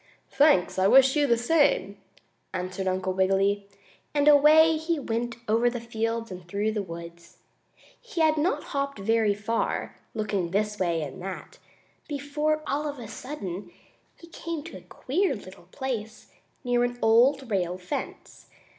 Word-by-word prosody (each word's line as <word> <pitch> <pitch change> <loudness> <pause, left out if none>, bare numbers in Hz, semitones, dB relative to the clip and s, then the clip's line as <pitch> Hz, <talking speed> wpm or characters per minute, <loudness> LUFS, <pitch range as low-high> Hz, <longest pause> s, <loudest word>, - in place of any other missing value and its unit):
"Thanks, 280 - +3
I 190 - +4
wish 265 +5 +6
you 295 -1 +3
the 235 -2 +3
same," 325 - +2 0.6
answered 185 +1 -3
Uncle 185 0 -1
Wiggily, 195 +2 +1 0.5
and 290 0 +2
away 305 +2 +7
he 325 +1 -1
went 235 -3 -3
over 230 +3 +3
the 245 0 -4
fields 230 -1 -3
and 180 -1 -9
through 205 +4 -1
the 215 -1 -2
woods. 170 -1 -10 0.6
He 440 -8 -4
had 315 -1 +4
not 335 +8 0
hopped 280 -2 -3
very 215 0 +2
far, 215 +3 -2 0.2
looking 205 -5 -1
this 210 +3 -1
way 170 -3 0
and 150 +5 -8
that, 190 0 -7 0.5
before, 300 +1 -1
all 295 +2 -1
of 290 -1 -5
a 235 -3 -8
sudden, 200 -7 -7 0.5
he - - -13
came 335 -2 -6
to 330 - -9
a - - -13
queer 275 - -1
little 185 -3 -12
place, 235 -5 -5 0.3
near 245 -1 +2
an 245 0 -2
old 245 +3 +4
rail 180 -2 0
fence. 180 0 -7
230 Hz, 155 wpm, -26 LUFS, 195-285 Hz, 0.6 s, away